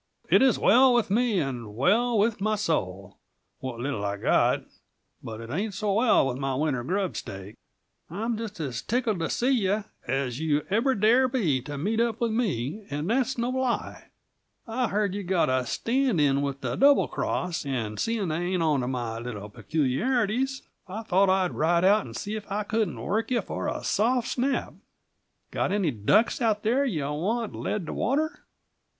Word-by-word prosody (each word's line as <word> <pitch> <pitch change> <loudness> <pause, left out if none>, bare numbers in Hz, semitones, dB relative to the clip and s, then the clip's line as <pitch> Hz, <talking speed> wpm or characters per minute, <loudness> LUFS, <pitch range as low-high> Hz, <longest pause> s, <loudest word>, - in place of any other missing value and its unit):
"It - - +6
is 265 -4 +4
well 250 +4 +5
with 235 -5 +1
me, 225 -2 +2
and 120 -7 -4
well 230 - +2
with 215 0 +1
my 215 +1 +1
soul 100 - -2 0.4
what 130 -3 -6
little 120 -5 -3
I've 100 0 -3
got - - +3 0.6
but 110 -1 -7
it 115 +1 -8
ain't 200 +6 -2
so 210 -2 0
well 225 - +4
with 125 -2 -2
my 135 -1 -2
winter 135 -3 0
grub 190 +5 -1
stake. 95 +1 -7 0.6
I'm 225 +7 -2
just 215 -3 -6
as 130 -6 -3
tickled 230 -4 -1
to 165 - -1
see 250 +3 +1
you 210 -4 +1 0.2
as 130 0 -1
you 150 -2 0
ever 245 +6 +2
dare 230 +6 +4
be 185 - 0
to 145 +3 -7
meet 210 +10 -1
up 235 -1 0
with 235 -2 0
me, 210 - -1
and 150 +3 -3
that's 260 +1 +1
no 240 +1 -1
lie. 260 -2 -2 0.6
I 245 +2 -1
heard 205 -1 0
you've 200 -2 -5
got 180 -6 +2
a 130 -1 0
stand 250 - 0
in 140 -1 +3
with 140 -1 -3
the - - -2
Double 280 +1 +5
Cross, 180 -2 -2
and 115 -6 -3
seeing 225 -5 -1
they 155 - -1
ain't 175 -1 0
on 150 -3 +2
to 125 - -3
my 120 -3 -3
little 105 -4 -6
peculiarities, 220 - 0 0.2
I 210 +5 -6
thought 195 -2 +3
I'd 185 -1 +2
ride 170 +3 +2
out 205 +2 +4
and - - -10
see 210 - -4
if 210 -2 -8
I 210 +2 -1
couldn't 210 - -1
work 215 - -1
you 245 -3 +1
for - - -4
a - - -3
soft 235 +3 +1
snap. 265 +2 -1 0.8
Got - - -1
any 195 -6 +1
ducks 165 - +2
out 215 -3 +1
there 245 +6 +2
you 170 - -1
want 210 +9 -2
led 210 -5 -3
to - - -5
water?" 305 +7 -1
195 Hz, 190 wpm, -26 LUFS, 140-230 Hz, 0.8 s, It